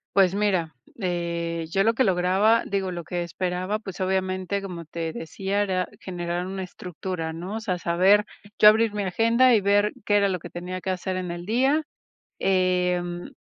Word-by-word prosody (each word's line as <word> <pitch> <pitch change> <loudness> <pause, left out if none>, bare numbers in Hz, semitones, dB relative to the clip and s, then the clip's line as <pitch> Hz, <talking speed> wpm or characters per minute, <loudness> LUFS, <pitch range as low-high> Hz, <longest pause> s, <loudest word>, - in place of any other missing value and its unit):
Pues, 190 -2 +5
mira, 190 -6 0 0.3
eh, 170 -2 -2
yo 195 +2 +2
lo 225 +2 +3
que 260 - +2
lograba, 190 +4 +3
digo, 195 -2 -2
lo 175 -1 -5
que 175 +1 -3
esperaba, 180 +4 -2
pues 195 -3 -8
obviamente, 185 +1 -1
como 175 -3 -6
te 165 +1 -4
decía, 195 +5 -2
era 185 -3 0
generar 175 -1 -4
una 190 0 -4
estructura, 180 -2 -5
¿no? 180 +6 -6
O - - -3
sea, 200 -5 -2
saber 185 +5 +3 0.3
yo 210 - +7
abrir 220 0 +3
mi 205 -1 -2
agenda, 230 +7 +4
y 220 - +4
ver 205 +1 +3
qué 205 +1 +3
era 200 -1 +3
lo 185 -1 -2
que - - -9
tenía 180 +1 -6
que 190 - -4
hacer 185 0 -2
en 180 -1 -4
el 175 0 -6
día, 265 - +2 0.6
em, 180 -2 0
185 Hz, 185 wpm, -25 LUFS, 175-205 Hz, 0.6 s, yo